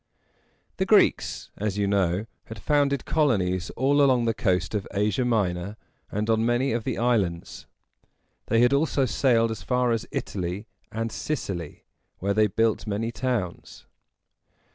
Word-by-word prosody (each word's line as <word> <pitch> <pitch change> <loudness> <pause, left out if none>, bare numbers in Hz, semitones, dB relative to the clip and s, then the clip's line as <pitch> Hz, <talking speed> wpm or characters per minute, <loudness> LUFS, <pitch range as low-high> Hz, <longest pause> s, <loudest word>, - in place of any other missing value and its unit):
The - - +1
Greeks, - - +2
as 105 -1 -2
you 100 - +1
know, 100 0 +1 0.2
had 110 - -9
founded 140 +2 +1
colonies 95 - +1
all 140 +2 +3
along 130 -4 +4
the 115 - +1
coast 90 -5 0
of 105 -2 -2
Asia 105 +4 +1
Minor 100 -4 -1 0.3
and 105 +1 -2
on 110 0 +2
many 120 +3 +1
of 115 -1 -2
the 130 - -2
islands. 105 -9 -1 0.8
They 115 - +3
had 125 +2 +4
also 140 -1 +2
sailed 115 -1 +2
as 110 - -5
far 125 -1 +1
as 115 -1 -1
Italy 95 +2 -4 0.3
and 115 +1 -3
Sicily, 95 - -4 0.3
where 100 +2 -1
they 105 +1 +3
built 110 +2 0
many 110 +3 -2
towns. 120 -8 -4
110 Hz, 145 wpm, -25 LUFS, 100-125 Hz, 0.8 s, along